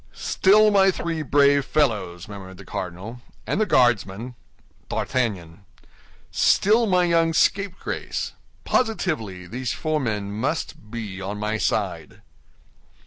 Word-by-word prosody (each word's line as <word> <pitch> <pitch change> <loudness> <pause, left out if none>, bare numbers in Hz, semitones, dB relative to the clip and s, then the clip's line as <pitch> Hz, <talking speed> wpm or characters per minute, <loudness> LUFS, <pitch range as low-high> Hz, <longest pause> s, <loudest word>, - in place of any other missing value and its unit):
"Still 210 +3 +4
my 195 -1 +5
three 170 -3 -2
brave 140 0 +4
fellows!" 105 - 0
murmured 95 -2 -10
the 100 - -12
cardinal. 95 +8 -6 0.2
"And 215 - -1
the 215 - +2
Guardsman?" 120 -1 +2 0.6
"D'Artagnan." 95 -8 -2 0.7
"Still 220 +3 +3
my 180 -2 +3
young 165 -1 +2
scapegrace. 195 +3 -1 0.3
Positively, 155 - -1
these 125 +6 -4
four 155 -1 -1
men 105 -6 -2
must 110 -1 -3
be 105 -4 -6
on 100 +2 -4
my 105 +1 -2
side." - - -2
125 Hz, 115 wpm, -23 LUFS, 100-165 Hz, 0.7 s, my